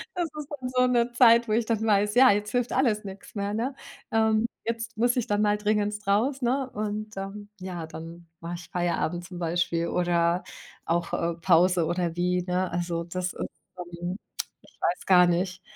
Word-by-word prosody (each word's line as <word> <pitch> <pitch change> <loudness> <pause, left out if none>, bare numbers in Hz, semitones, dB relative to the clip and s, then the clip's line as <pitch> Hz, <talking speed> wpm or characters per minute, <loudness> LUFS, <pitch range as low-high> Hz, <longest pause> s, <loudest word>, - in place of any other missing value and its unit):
Das 350 -1 0
ist 295 - -5
dann 255 -1 -4
so 255 0 +3
'ne 240 -1 +2
Zeit, 235 -1 +6
wo 215 - 0
ich 230 +1 +2
dann 225 -1 0
weiß, 210 0 +2
ja, 255 +1 +8
jetzt 205 +1 -1
hilft 245 -1 0
alles 235 -5 +2
nix 195 0 -10
mehr, 200 0 -2
ne? 245 +5 -2 0.4
Ähm, 220 0 +3 0.2
jetzt 230 -1 -4
muss 240 +2 +3
ich 245 - 0
dann 205 0 +1
mal 210 0 +3
dringenst 210 0 -1
raus, 245 +8 +2
ne 260 +2 0
und, 215 0 -4
ähm, 200 +1 -6
ja, 180 -3 -5
dann 165 +1 -10
mache 170 +1 -5
ich 170 -1 -10
Feierabend 175 -1 -1
zum 180 -1 -8
Beispiel 170 0 0
oder 175 0 +1 0.4
auch, 170 0 -1
äh, 170 0 0
Pause 175 0 +4
oder 175 0 -1
wie, 180 +1 +1
ne? 180 0 -1
Also, 170 -1 -2
das, 180 +1 -3
ist, - - -14 0.4
ähm 175 +1 -5 0.5
ich - - -23
weiß 175 - 0
gar 180 -2 +6
nicht. 180 +1 -1
200 Hz, 190 wpm, -27 LUFS, 175-225 Hz, 0.5 s, ja